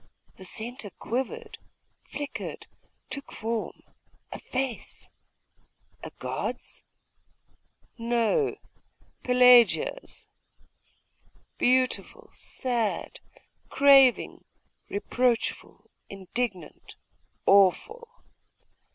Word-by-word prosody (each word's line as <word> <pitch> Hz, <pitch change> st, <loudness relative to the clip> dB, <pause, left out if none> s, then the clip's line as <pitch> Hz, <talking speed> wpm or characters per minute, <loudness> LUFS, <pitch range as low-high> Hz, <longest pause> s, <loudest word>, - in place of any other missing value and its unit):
The 190 Hz, -, -10 dB
centre 230 Hz, +3 st, -6 dB
quivered, 430 Hz, -, -5 dB, 0.5 s
flickered, 290 Hz, -1 st, -6 dB, 0.5 s
took 280 Hz, -1 st, -6 dB
form 225 Hz, 0 st, -4 dB, 0.5 s
a -, -, -7 dB
face. 260 Hz, -3 st, -5 dB, 0.9 s
A -, -, -7 dB
god's? -, -, -5 dB, 1.2 s
No 235 Hz, -, +1 dB, 0.7 s
Pelagia's. 250 Hz, -, +4 dB, 1.3 s
Beautiful, 255 Hz, +1 st, 0 dB
sad, 240 Hz, -4 st, -3 dB, 0.5 s
craving, 275 Hz, -2 st, +5 dB, 0.5 s
reproachful, 235 Hz, +3 st, -2 dB, 0.2 s
indignant, 195 Hz, -2 st, -5 dB, 0.5 s
awful.... 200 Hz, -, +3 dB
245 Hz, 55 wpm, -27 LUFS, 220-270 Hz, 1.3 s, craving